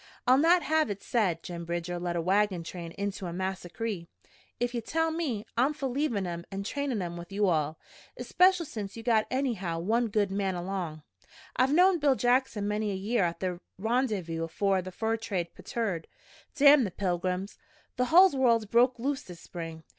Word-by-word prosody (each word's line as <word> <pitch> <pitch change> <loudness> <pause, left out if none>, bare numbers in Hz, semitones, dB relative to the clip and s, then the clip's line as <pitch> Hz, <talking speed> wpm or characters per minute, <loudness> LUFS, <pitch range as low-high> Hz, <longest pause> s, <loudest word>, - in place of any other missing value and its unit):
I'll 255 +1 +5
not 340 +3 +5
have 315 -4 +2
it 200 -1 -5
said 190 -9 0
Jim 170 -1 -6
Bridger 175 +1 -3
led 175 0 -2
a 170 - -1
wagon 190 -1 +1
train 170 0 -7
into 200 -2 -4
a - - -4
massacree. 185 +1 -4 0.5
If 245 0 -1
ye'll 240 - -2
let 325 0 +2
me, 270 -11 -2
I'm 265 +6 +2
for 280 -2 -2
leavin' 245 -7 -1
'em 170 -1 -4
an' 195 0 -4
trainin' 210 -9 -3
with 170 +2 -9
you 205 +1 +1
all, 155 -2 0 0.4
especial 365 -1 +3
since 210 -6 -6
you 225 - -7
got 225 -2 +2
anyhow 230 -11 -1
one 225 +8 +1
good 205 -2 0
man 195 -1 -1
along. 175 -4 -4 0.5
I've 255 +2 +3
knowed 355 +1 +4
Bill 280 -2 +4
Jackson 245 -4 +1
many 210 0 -1
a 200 - -2
year 205 +3 0
at 170 0 -3
the 180 -2 -2 0.2
Rendyvous 210 -7 -1
afore 190 +3 0
the 185 +1 -8
fur 225 +4 -1
trade 185 -6 -3
petered. 200 -9 -3 0.5
Damn 285 -1 +7
the 205 - -1
pilgrims! 185 +1 -2 0.4
The 250 - +2
hull 360 +7 +7
world's 240 -5 +3
broke 240 +4 +3
loose 270 +3 -2
this 175 -2 -11
spring. 165 -2 -7
205 Hz, 185 wpm, -29 LUFS, 180-250 Hz, 0.5 s, Damn